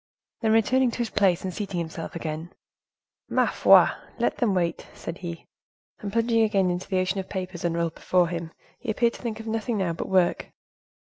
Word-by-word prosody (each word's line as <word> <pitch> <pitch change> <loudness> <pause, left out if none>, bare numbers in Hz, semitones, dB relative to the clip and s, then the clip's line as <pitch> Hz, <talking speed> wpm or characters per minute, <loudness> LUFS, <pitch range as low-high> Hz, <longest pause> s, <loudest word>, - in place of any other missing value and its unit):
Then 220 -2 +2
returning 250 +3 +3
to - - -5
his 240 -2 -2
place, 190 -4 +2
and 185 -1 -3
seating 195 -1 -4
himself 165 0 -5
again, 160 +1 -5 0.8
"Ma - - +3
foi! - - +6 0.3
let - - 0
them 220 -6 +1
wait," 170 -2 -1
said 165 - -7
he. 170 -3 -6 0.5
And 205 -2 -5
plunging 230 +1 +2
again 200 -4 +3
into 180 +1 -4
the 190 - +1
ocean 185 +1 0
of 190 - -6
papers 185 -3 -5
unrolled 170 -1 0
before 180 0 +2
him, 165 -1 -4 0.3
he 245 - -7
appeared 235 +2 +2
to - - -11
think 230 -3 -4
of 225 - -8
nothing 225 +1 -1
now 185 -4 0
but 165 - -5
work. 185 -2 +2
190 Hz, 195 wpm, -26 LUFS, 170-220 Hz, 0.8 s, foi